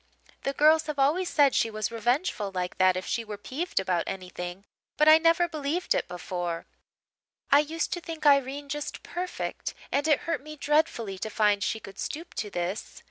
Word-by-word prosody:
The 275 - -2
girls 310 +2 +4
have 300 -1 -3
always 310 +7 +2
said 285 -4 +4
she 230 - +2
was 215 0 -3
revengeful 235 - 0
like 180 0 -3
that 185 -1 +5
if 185 - -4
she 235 -1 -1
were 210 -2 -7
peeved 275 - -2
about 185 -3 0
anything; 180 0 -6 0.3
but 305 - +4
I 310 +1 +9
never 335 +1 +4
believed 315 +2 -1
it - - -1
before; 175 -1 -4 0.9
I 285 - +8
used 315 +3 -1
to 350 - -4
think 325 -2 -7
Irene 280 0 +3
just 295 +1 -5
perfect, 360 +1 -4 0.2
and 285 +2 +1
it 300 - +3
hurt 330 -5 -2
me 305 +2 -9
dreadfully 285 - 0
to 220 - -3
find 210 -2 +2
she 220 - -1
could 195 -2 -12
stoop 330 +3 -5
to 210 - -2
this. 180 +3 -4
275 Hz, 190 wpm, -27 LUFS, 200-310 Hz, 0.9 s, I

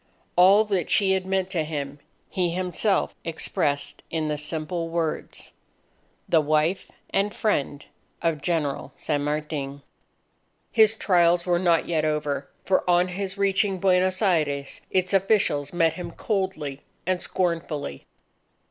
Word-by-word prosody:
All 195 +4 +6
that 195 -6 -1
she 195 -2 +3
had 190 -1 0
meant 190 -1 0
to 170 -5 0
him, 145 -2 -5 0.3
he 180 -2 0
himself 185 +3 +1
expressed 150 -3 -1
in 160 -2 -1
the 150 - -1
simple 165 +2 -3
words: 165 -2 -2 0.8
"The 160 - +4
wife 155 +5 0 0.2
and 200 +1 +1
friend 145 -10 -1 0.3
of 165 -3 -1
General 150 -3 -1
San 145 -2 -1
Martin." 145 -2 -3 0.9
His 220 -1 +5
trials 175 -4 +3
were 175 -1 +2
not 170 -2 +2
yet 160 -2 0
over. 150 -2 -1 0.2
For 190 - +2
on 175 +1 +4
his 190 +1 -4
reaching 195 0 +2
Buenos 185 +1 +2
Aires, 150 -7 0
its 185 0 0
officials 190 -8 +2
met 165 -2 +2
him 180 - -6
coldly 190 -9 -3 0.2
and 185 0 0
scornfully. 165 - -2
170 Hz, 130 wpm, -25 LUFS, 150-190 Hz, 0.9 s, All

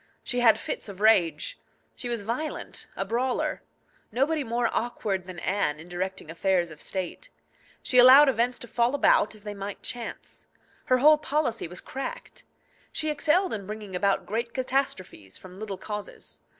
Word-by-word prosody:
She 245 - -2
had 230 -3 +6
fits - - -4
of 195 -1 -9
rage. 220 - +3 0.4
She 245 - -5
was 235 -3 -2
violent, 245 +9 -4
a - - -2
brawler. 250 +2 -1 0.5
Nobody 285 +6 +1
more 235 0 0
awkward 195 -6 -2
than 185 -1 -8
Anne 165 -5 -1
in 165 - -11
directing 180 -1 -4
affairs 175 -1 +1
of 155 - -11
state. 190 - -4 0.5
She 250 - +4
allowed 265 +4 +9
events 245 -1 +1
to 240 - -8
fall 240 +3 +1
about 215 -6 +3
as 210 - -12
they 210 -1 -5
might 200 0 -7
chance. 240 -2 -7 0.4
Her 255 - +4
whole 300 +4 +6
policy 290 - -1
was 180 +2 -6
cracked. 270 +1 -7 0.5
She 310 -1 -1
excelled 325 +5 +2
in 200 -3 -5
bringing 210 -3 -6
about 195 +2 +1
great 230 +3 -3
catastrophes 255 - -2
from 185 -1 -13
little 200 0 -6
causes. 210 0 -3
225 Hz, 165 wpm, -27 LUFS, 190-255 Hz, 0.5 s, allowed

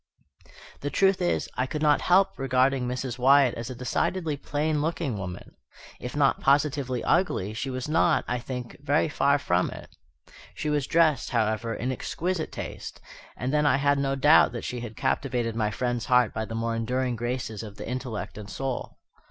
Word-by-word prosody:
The 145 - -3
truth 190 +3 +2
is, 175 - 0
I 130 - 0
could 150 +3 -3
not 150 -1 +4
help 190 +2 +3
regarding 130 0 +2
Mrs. 125 0 -4
Wyatt 135 0 +5
as 115 +2 -6
a 130 - -6
decidedly 155 +6 -1
plain 150 +2 -1
looking 160 -5 -1
woman. 90 -3 -7 0.4
If 125 - -6
not 140 -2 +3
positively 140 -3 +1
ugly, 165 - +1
she 120 +5 -3
was 130 0 -4
not, 165 +1 +2
I 125 0 -1
think, 125 0 -6
very 145 +2 +2
far 140 0 +3
from 90 -10 +1
it. - - -11 0.6
She 150 - -2
was 145 -3 0
dressed, 160 -3 +3
however, 115 0 0
in 125 +3 -2
exquisite 170 +6 -3
taste, - - -7 0.4
and 125 +3 -2
then 150 -1 +3
I 135 - +4
had 140 0 +2
no 135 0 0
doubt 145 -2 +5
that 120 - -5
she 125 - -4
had 115 -2 -8
captivated 120 -4 -1
my 110 -2 +1
friend's 120 +2 -2
heart 125 -2 +3
by 110 - -2
the 115 - -6
more 115 0 -1
enduring 125 +2 -1
graces 120 -2 -3
of 105 -2 -9
the - - -7
intellect 125 -4 -5
and 105 -1 -9
soul. 135 +1 -4
130 Hz, 185 wpm, -26 LUFS, 120-145 Hz, 0.6 s, Wyatt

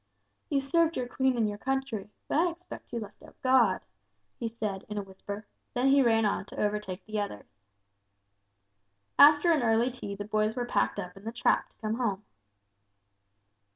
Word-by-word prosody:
"You 280 -1 +2
served 330 +4 +2
your 250 - -2
Queen 260 0 +1
and 210 -2 -1
country, 265 -6 -2 0.2
but - - +1
I 350 +2 +4
expect 345 +2 -10
you 235 - -2
left 210 -2 -10
out - - -16
God," 255 -2 +4 0.6
he 230 - -2
said, 210 -4 -4
in 210 - -4
a 205 - -1
whisper; 200 +2 -8 0.3
then 250 +2 +3
he 275 0 +6
ran 225 -3 +4
on 200 - 0
to - - -9
overtake 210 -2 -2
the 215 0 -3
others. 200 - -4 1.7
After 295 +4 +8
an 310 -4 +3
early 230 +2 +3
tea 205 -5 -6
the 205 +1 -6
boys 215 +1 0
were 245 -1 -1
packed 110 - +1
up 180 - -6
in 195 - -13
the 225 - -4
trap 240 - +1
to - - -37
come 215 0 -1
home. 210 -5 -1
225 Hz, 180 wpm, -29 LUFS, 205-265 Hz, 1.7 s, After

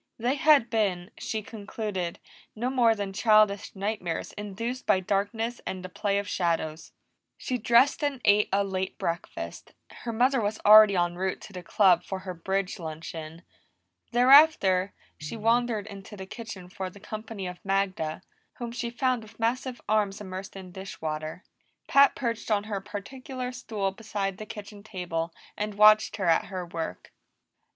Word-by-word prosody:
They 240 +3 +1
had 285 -5 +4
been, 195 -4 0
she 220 -1 -3
concluded, 205 -4 -4 0.4
no 240 +4 -1
more 235 -4 +4
than 200 -2 -4
childish 215 -1 +3
nightmares 195 -4 -3
induced 230 +5 -5
by 190 - +4
darkness 205 +5 -1
and 185 -1 -5
the - - -6
play 200 +1 -1
of 200 0 -2
shadows. 165 -3 -1 0.5
She 250 -1 -3
dressed 240 +7 +4
and 285 -3 0
ate 205 +1 +5
a 200 +1 +3
late 190 -1 -3
breakfast; 170 +1 -5 0.2
her 235 - -6
mother 250 +3 +2
was 210 +1 -1
already 215 -1 +9
en 175 -1 +1
route 190 +1 -1
to 200 - -11
the 180 - -6
Club 180 0 +4
for 190 - -4
her 185 -1 -6
bridge 190 +3 -2
luncheon. 160 0 -7 0.7
Thereafter, 245 -7 +6 0.3
she 150 +9 -6
wandered 230 -1 +1
into 200 0 -10
the 190 - -7
kitchen 205 -3 -8
for 185 +1 -5
the 200 - -15
company 215 -1 -6
of 180 0 -7
Magda, 195 -5 -1 0.3
whom 240 -1 -6
she 235 0 -3
found 250 0 0
with 220 +1 -15
massive 245 +2 -1
arms 210 -2 +1
immersed 190 -1 -7
in 190 -2 -9
dish 190 +2 -8
water. 155 +3 -4 0.4
Pat 280 -1 +6
perched 230 -3 -3
on 205 -2 +2
her 205 -2 -4
particular 250 +5 -6
stool 215 -6 -3
beside 200 -2 -4
the 215 - -7
kitchen 205 0 -9
table 175 -5 -4 0.2
and 210 0 -3
watched 215 +1 +6
her 195 - -2
at 165 -1 +3
her 185 -2 -5
work. 165 - -6
205 Hz, 160 wpm, -27 LUFS, 185-230 Hz, 0.7 s, already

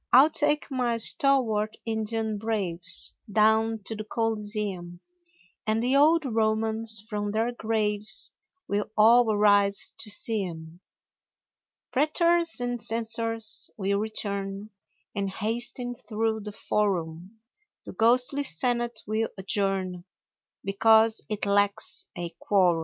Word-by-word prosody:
I'll 275 +6 +7
take 295 -1 +1
my 245 -3 0
stalwart 230 -5 +3
Indian 220 -1 -2
braves 185 -5 -1 0.2
Down 220 +1 +2
to 220 - -5
the 215 - -6
Coliseum, 210 -5 -3 0.7
And 220 +1 +1
the 255 +2 +1
old 310 +2 +4
Romans 220 -1 +1
from 205 -2 -3
their 225 +3 -1
graves 215 - -2 0.4
Will 205 +1 -2
all 230 +2 +5
arise 205 -1 +2
to 225 -1 -4
see 210 0 0
'em; 165 -1 -9 1.1
Pretors 335 +4 +2
and 245 -1 -3
censors 225 -1 0
will 200 -1 -1
return 200 -1 -3 0.4
And 200 -1 -2
hasten 240 +5 -3
through 225 -1 -3
the 210 0 -7
Forum, 190 -1 -3 0.5
The - - -8
ghostly 250 +5 +3
Senate 240 - -1
will 220 +1 -1
adjourn 190 -2 -1 0.6
Because 220 +3 +3
it 210 -1 -3
lacks 205 0 0
a 170 -1 -6
quorum. 180 -5 +2
220 Hz, 115 wpm, -26 LUFS, 200-230 Hz, 1.1 s, I'll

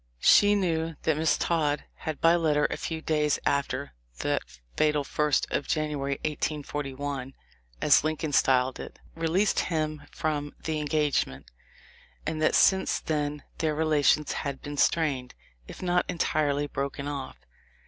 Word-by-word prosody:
She 205 0 +6
knew 165 -4 0
that 160 - +2
Miss 155 +1 +2
Todd 150 -3 0
had 155 -2 -5
by 165 +1 +5
letter 150 -3 +2
a - - -1
few 160 -1 -4
days 150 -2 +1
after 140 - -1 0.3
"that - - 0 0.3
fatal 150 -1 +2
first 150 +1 +1
of - - -1
January, 150 -3 -1
1841," 145 -3 -3 0.5
as - - +6
Lincoln 155 -1 -2
styled 130 -1 +3
it, - - -8 0.2
released 165 +5 +1
him 155 -2 -1
from 145 -2 -3
the 155 -1 -1
en 150 - -3
gagement, 145 - 0 0.8
and 155 0 -2
that 155 - +3
since 190 -1 +4
then 150 -2 -2 0.2
their 155 -2 0
relations 150 -1 +2
had 140 -2 -3
been 145 0 -5
strained, 140 -6 +1 0.3
if - - -9
not 175 0 +1
entirely 150 -4 0
broken 140 0 -4
off. 140 - -5
150 Hz, 140 wpm, -27 LUFS, 145-160 Hz, 0.8 s, She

